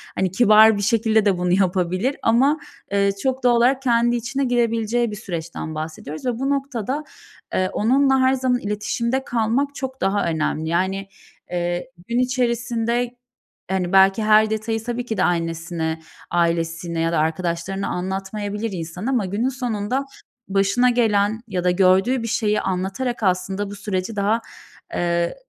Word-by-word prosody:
hani 190 -1 0
kibar 215 +1 +6
bir - - -2
şekilde 220 0 +2
de 195 -3 +3
bunu 180 0 0
yapabilir 185 +6 +1
ama, 270 +7 +3 0.3
eee, 200 0 +3
çok 260 -1 -1
doğal 245 -1 +5
olarak 255 +3 +3
kendi 240 -2 +2
içine 265 +4 -2
girebileceği 235 -1 +1
bir - - -5
süreçten 170 -5 -6
bahsediyoruz 155 - -6
ve 245 -2 -1
bu 270 +1 -1
noktada, 275 0 -2 0.5
eee, 185 0 +1
onunla 265 +4 +3
her 260 0 +4
zaman 255 -1 +1
iletişimde 235 +4 -2
kalmak 245 +5 0
çok 265 -1 -6
daha 195 +1 +1
önemli. 160 -1 -1
Yani, 190 +3 -1 0.4
eee, 175 0 -2 0.2
gün 235 +1 0
içerisinde 240 -1 0 0.6
hani 185 -1 -1
belki 195 +2 +5
her 215 0 +5
detayı 220 +1 -2
tabii 240 +1 -3
ki 220 -3 -3
de 185 - +2
annesine, 165 -1 -1 0.3
ailesine 170 0 0
ya 165 0 +1
da 165 - +1
arkadaşlarına 170 +4 -1
anlatmayabilir 200 +4 -3
insan 175 +1 -6
ama 250 -6 +1
günün 205 +7 -1
sonunda 250 0 -2 0.4
başına 200 +6 +3
gelen 220 -3 +2
ya 185 -4 -2
da 180 - +3
gördüğü 190 +7 +3
bir - - -3
şeyi 210 -2 +1
anlatarak 195 +7 -2
aslında 190 +2 0
bu - - -7
süreci 200 0 -3
daha, 210 +3 +1 0.5
eee, 170 0 0
210 Hz, 150 wpm, -22 LUFS, 185-240 Hz, 0.6 s, kibar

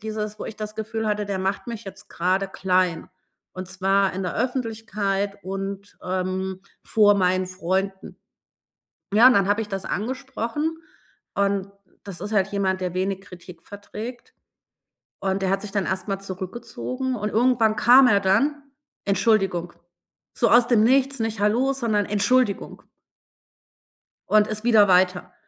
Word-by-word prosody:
dieses, 215 -1 -5
wo - - -6
ich 220 - -7
das 215 0 -6
Gefühl 220 0 -3
hatte, 210 0 0
der 195 -2 -2
macht 195 +4 -2
mich 230 -2 -6
jetzt 195 - -11
grade 185 +3 0
klein. 185 -3 0 0.5
Und 185 0 -7
zwar 195 +1 +1
in 190 - -3
der 180 - -3
Öffentlichkeit 215 -5 -2
und, 195 +1 -6
ähm, 185 +1 -2 0.2
vor 205 -2 +4
meinen 185 -1 +1
Freunden. 190 +1 -3 0.9
Ja, 225 +4 +7
und - - +5
dann 195 0 +3
habe 205 +2 +2
ich 210 - -8
das 195 -1 -4
angesprochen 265 +6 -3 0.6
und 200 -1 0 0.3
das 190 -4 -8
ist 205 +2 -5
halt 195 -2 +2
jemand, 190 -2 -1
der 180 -1 -2
wenig 190 +1 -2
Kritik 180 -2 -13
verträgt. 215 +4 -9 0.9
Und 195 0 -1
der 185 - +1
hat 195 - 0
sich 210 -2 -7
dann 200 -2 -1
erst 190 +2 -3
mal 195 -1 -2
zurückgezogen 235 +7 -5
und 210 -1 -3
irgendwann 225 -1 +2
kam 250 +4 +7
er 205 -3 +4
dann: 275 +10 +1 0.4
„Entschuldigung.“ 195 -4 +1 0.6
So 235 - +2
aus 240 0 +5
dem 225 -3 +4
Nichts, 270 +2 +3
nicht 225 -2 -2
„Hallo“, 240 +7 +2
sondern 220 -6 0
„Entschuldigung“. 210 +2 0 1.5
Und 215 0 +4
ist 215 +1 -5
wieder 215 -4 +5
weiter. 180 0 +2
205 Hz, 150 wpm, -23 LUFS, 190-225 Hz, 1.5 s, Ja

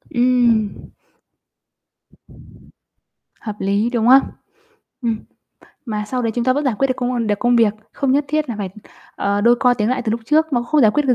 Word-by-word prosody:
Ừm. 240 -4 +1 2.5
Hợp 215 -2 -6
lý, 200 +4 0
đúng 235 -2 0
hông? 260 +2 +8 0.8
Ừm. 230 -2 -1 0.7
Mà 210 -4 -3
sau 250 +2 -3
đấy 230 - -1
chúng 240 - -1
ta 255 - +3
vẫn 290 +3 -2
giải 260 -5 +1
quyết 270 - +3
được 255 - 0
công, 250 0 -2
ưm 235 -2 -1
được 205 -1 0
công 245 0 +2
việc, 220 -3 +3 0.2
không 275 -2 0
nhất 285 +2 +2
thiết 305 -1 -1
là 235 - -3
phải, 195 -3 -4 0.5
ờ, 200 0 0
đôi 235 +3 +4
co 250 -1 +4
tiếng 215 -2 -1
lại 255 0 -1
từ 225 - -2
lúc 230 - -2
trước, 310 +4 +1
nó 240 -2 +1
không 295 +5 +1
giải 220 -5 +5
quyết 295 - +1
được 255 - +4
240 Hz, 205 wpm, -19 LUFS, 220-255 Hz, 2.5 s, hông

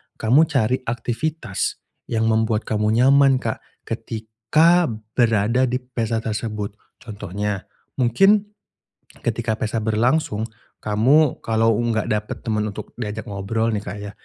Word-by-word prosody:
kamu 140 +8 +4
cari 130 -4 +1
aktivitas 120 +1 -2 0.2
yang 115 -1 +1
membuat 110 0 +1
kamu 105 0 0
nyaman 135 +2 +5
Kak, 110 - -2 0.2
ketika 120 +11 +1 0.2
berada 115 +1 +2
di 125 +1 -2
pesta 115 -2 -2
tersebut. 105 -2 -3 0.2
Contohnya, 105 -2 -5 0.3
mungkin 200 - +3 0.7
ketika 115 -1 -1
pesta 110 +1 -2
berlangsung. 110 +1 +1 0.4
Kamu, 125 +8 +3
kalau 115 0 +2
enggak 115 -2 0
dapet 105 0 -3
temen 110 -2 -1
untuk 100 - -7
diajak 110 -1 -4
ngobrol, 110 +2 -2
nih, 105 - 0
Kak, 100 - -7
Ya. 100 - -6
115 Hz, 120 wpm, -22 LUFS, 105-125 Hz, 0.7 s, nyaman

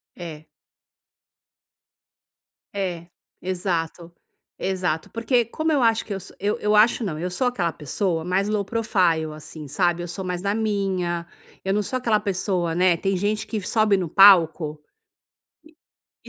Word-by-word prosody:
É. 160 -3 -9 2.3
É, 175 -4 -3 0.3
exato, 175 -2 -3 0.5
exato, 180 -4 -2
porque 235 +1 +1
como 315 +7 -2
eu 285 -4 +2
acho 225 -1 +2
que 205 - -5
eu 195 - -4
sou 195 - -13
eu 205 +2 -1
eu 210 0 +2
acho 225 +2 +4
não, 160 -7 -3
eu 180 +3 -3
sou 250 +7 0
aquela 180 -9 0
pessoa 165 +3 -2
mais 190 +3 +1
low 210 -1 0
profile, 185 -8 +1
assim, 155 0 -9
sabe. 175 +2 0
Eu - - -5
sou 190 +3 -5
mais 180 -1 -3
da 200 +1 0
minha, 190 -6 -1 0.4
eu 195 0 0
não 210 - +2
sou 255 - -2
aquela 225 -4 +1
pessoa, 185 -4 -1
né. 180 -1 +3
Tem 195 +2 0
gente 210 +3 -1
que 215 -3 -3
sobe 210 0 +2
no 175 -4 -2
palco 165 -6 +5 1.4
e - - -13
190 Hz, 155 wpm, -23 LUFS, 170-210 Hz, 2.3 s, palco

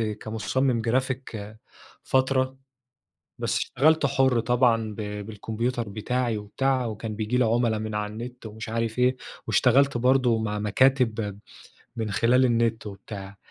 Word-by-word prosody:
كمصمم 110 +3 -1
جرافيك 120 -3 -2 0.5
فترة، 130 0 +1 0.8
بس - - -1
اشْتَغَلْت 155 +2 +2
حُر 130 -3 +2
طبعًا 115 -3 +2
ب - - -15 0.3
بالكمبيوتر 115 +2 -3
بِتَاعِي 115 +2 -1
وبتاع، 130 +5 0
وكان 110 -1 -5
بييجي 110 +3 -1
لي 125 - +4
عُملا 115 -1 +2
من 110 0 -4
على 105 0 -2
النت، 120 +2 -8
ومش 110 +1 -8
عارف 115 +1 -2
إيه، 125 +1 +3 0.3
واشتغلت 135 +1 +3
برضو 125 -2 +3
مع 105 -1 -2
مكاتب 110 -2 +1 0.6
من 110 -2 -3
خلال 125 +5 +3
النت 115 -2 +1
و 100 - -6
بتاع. 100 0 -9
115 Hz, 135 wpm, -26 LUFS, 110-130 Hz, 0.8 s, لي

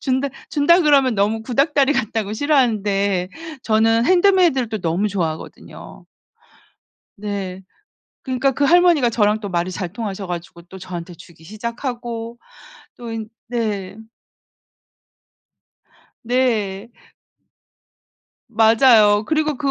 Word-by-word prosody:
준다 265 +1 -1 0.2
준다 320 +4 +4
그러면 280 -6 +3
너무 210 +2 0
구닥다리 275 +4 +1
같다고 220 -5 -2
싫어하는데 210 -8 +1 0.3
저는 225 +1 +2
핸드메이드를 355 - +3
또 220 -1 -4
너무 180 +3 -1
좋아하거든요. 170 -6 -6 1.1
네. 195 -2 -5 0.6
그니까 260 +1 0
그 285 +2 0
할머니가 340 -4 +4
저랑 215 -2 +1
또 205 - -5
말이 175 0 -2
잘 180 -1 -5
통하셔 205 -3 -5
가지고 175 -1 -7
또 190 +2 -13
저한테 180 -1 -8
주기 165 0 -17
시작하고 235 - -6 0.6
또 235 -1 -8
인 220 -1 -5 0.2
네. 215 -6 -3 2.3
네. 230 -4 -1 1.6
맞아요. 220 -2 +4
그리고 305 -2 0
그 280 0 -1
225 Hz, 245 characters per minute, -20 LUFS, 200-260 Hz, 2.3 s, 준다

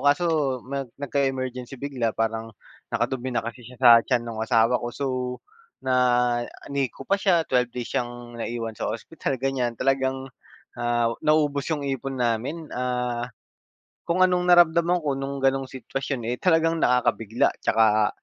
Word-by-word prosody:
kaso 145 +5 +3 0.4
nag 135 0 -4
nagka-emergency 135 -2 -2
bigla 125 -4 -2
parang 115 0 -1 0.4
nakadumi 130 0 -2
na - - 0
kasi 115 +2 -6
siya 125 - -12
sa 125 0 +5 0.2
tiyan 125 -3 +1
nung 115 -2 -5
asawa 115 +2 +3
ko 120 - -3
so, 140 - -2 0.8
na 130 - +1 0.8
NICU 135 -1 -2
pa 200 - +4
siya 180 -4 +4
12 125 -2 +2
days 125 -2 -5
siyang 120 -1 -4
naiwan 115 -1 -3
sa - - -3
ospital 135 +5 -3
ganyan 125 -2 -1
talagang, 135 0 0 0.5
ah, 120 -1 +1
naubos 150 -2 +2
yung 145 -3 -1
ipon 135 0 -3
namin, 125 +7 -1
ah, 125 -1 -2 0.8
kung 175 +2 +3
anong 180 -1 +1
naramdaman 175 0 +5
ko 145 - +1
nung 135 +1 -4
ganong 135 0 +2
sitwasyon, 130 0 -4
eh, - - -2
talagang 165 -2 +3
nakakabigla 120 -2 +2
'tsaka, 110 -1 +3
130 Hz, 145 wpm, -25 LUFS, 120-140 Hz, 0.8 s, sa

